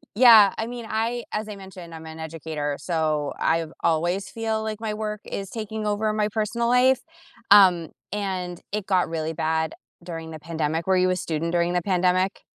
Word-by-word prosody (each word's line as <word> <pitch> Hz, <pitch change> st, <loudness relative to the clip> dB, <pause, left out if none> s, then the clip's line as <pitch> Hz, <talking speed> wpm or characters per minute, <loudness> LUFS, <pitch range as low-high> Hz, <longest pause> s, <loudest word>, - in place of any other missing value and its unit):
Yeah, 220 Hz, -5 st, +8 dB
I 225 Hz, -, -1 dB
mean, 240 Hz, -1 st, -6 dB
I 230 Hz, +2 st, -1 dB
As 215 Hz, 0 st, -3 dB
I 210 Hz, -, -6 dB
mentioned, 190 Hz, -3 st, -11 dB
I'm 160 Hz, 0 st, -9 dB
an 160 Hz, 0 st, -9 dB
educator, 155 Hz, -2 st, -4 dB
so, 155 Hz, -3 st, -1 dB
I've 165 Hz, -1 st, +1 dB
always 175 Hz, +4 st, +1 dB
feel 220 Hz, 0 st, -2 dB
like 215 Hz, -1 st, -4 dB
my 220 Hz, -2 st, -2 dB
work 215 Hz, -1 st, -4 dB
is 195 Hz, -1 st, -5 dB
taking 220 Hz, -1 st, -4 dB
over 210 Hz, +1 st, 0 dB
my 210 Hz, -1 st, +1 dB
personal 220 Hz, +2 st, -1 dB
life, 250 Hz, +1 st, +4 dB, 0.5 s
um, 180 Hz, -5 st, +7 dB, 0.2 s
and, 185 Hz, -4 st, -3 dB
it 210 Hz, -1 st, -2 dB
got 185 Hz, -4 st, +2 dB
really 160 Hz, -1 st, -2 dB
bad 160 Hz, 0 st, -1 dB, 0.3 s
during 165 Hz, -2 st, -6 dB
the 155 Hz, -, -7 dB
pandemic. 160 Hz, 0 st, -2 dB
Were 190 Hz, -1 st, +4 dB
you 185 Hz, 0 st, +3 dB
a 185 Hz, -, +2 dB
student 165 Hz, -1 st, -2 dB
during 175 Hz, 0 st, +1 dB
the 180 Hz, -, +1 dB
pandemic? 185 Hz, +1 st, +1 dB
185 Hz, 185 wpm, -24 LUFS, 165-215 Hz, 0.5 s, Yeah